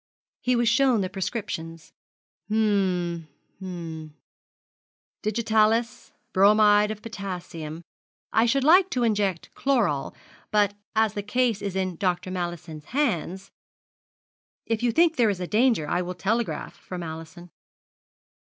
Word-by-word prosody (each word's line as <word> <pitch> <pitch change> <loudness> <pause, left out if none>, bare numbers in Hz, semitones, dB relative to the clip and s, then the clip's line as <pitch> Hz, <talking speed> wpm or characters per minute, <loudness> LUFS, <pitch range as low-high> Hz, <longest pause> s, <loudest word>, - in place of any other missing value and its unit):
He 250 0 +2
was 240 0 +2
shown 250 -2 +4
the 185 0 -3
prescriptions. 170 -5 -5 0.6
'Hum 185 -6 +1 0.3
hum 165 -5 -7 1.1
digitalis 220 +1 +1 0.2
bromide 210 +1 +5
of 215 -1 -6
potassium. 175 -7 -6 0.5
I 225 +2 +4
should 270 +3 +2
like 360 +6 +6
to 250 - 0
inject 205 -6 0
chloral; 205 - 0 0.3
but 205 -1 +2 0.2
as 220 -1 +3
the 205 - -3
case 230 0 0
is 200 -2 -4
in 185 -3 -1
Dr. 180 0 -1
Mallison's 175 -4 -5
hands 195 - -1 0.6
' - - -79
'If 225 -1 -1
you 240 -1 +2
think 330 +5 +3
there 235 -3 +4
is 200 - -1
danger 210 - +2
I 175 - 0
will 180 0 -5
telegraph 225 +5 -2
for 180 - -8
Mallison.' 170 +1 -8
200 Hz, 125 wpm, -25 LUFS, 175-230 Hz, 1.1 s, like